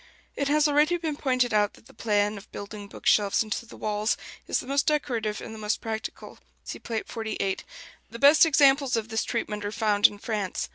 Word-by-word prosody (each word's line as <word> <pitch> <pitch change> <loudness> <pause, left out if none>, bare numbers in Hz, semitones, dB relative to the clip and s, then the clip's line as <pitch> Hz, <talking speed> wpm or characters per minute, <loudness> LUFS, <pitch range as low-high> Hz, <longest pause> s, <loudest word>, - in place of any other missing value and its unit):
It 280 - -1
has 300 +1 +3
already 300 +4 +3
been 320 -3 -3
pointed 255 -4 0
out 210 -1 +2
that - - -20
the - - -17
plan 210 -1 0
of 200 - -18
building 205 0 -8
book - - -13
shelves 205 +1 +3
into 220 +2 -4
the - - -12
walls 210 +1 -1 0.3
is - - +1
the - - -7
most 275 +1 0
decorative 240 -8 -1
and 220 - -8
the 220 - -9
most 210 0 -1
practical 220 -1 -6 0.2
(see - - -7
Plate 225 -2 -4
XLVIII). 220 -4 -3 0.5
The 235 - -8
best 285 +5 +7
examples 280 -3 +4
of 225 -1 -2
this 225 0 0
treatment 210 -3 -3
are 205 - -3
found 210 -1 +4
in 205 - -10
France. 205 -3 -3
225 Hz, 205 wpm, -26 LUFS, 210-275 Hz, 0.5 s, best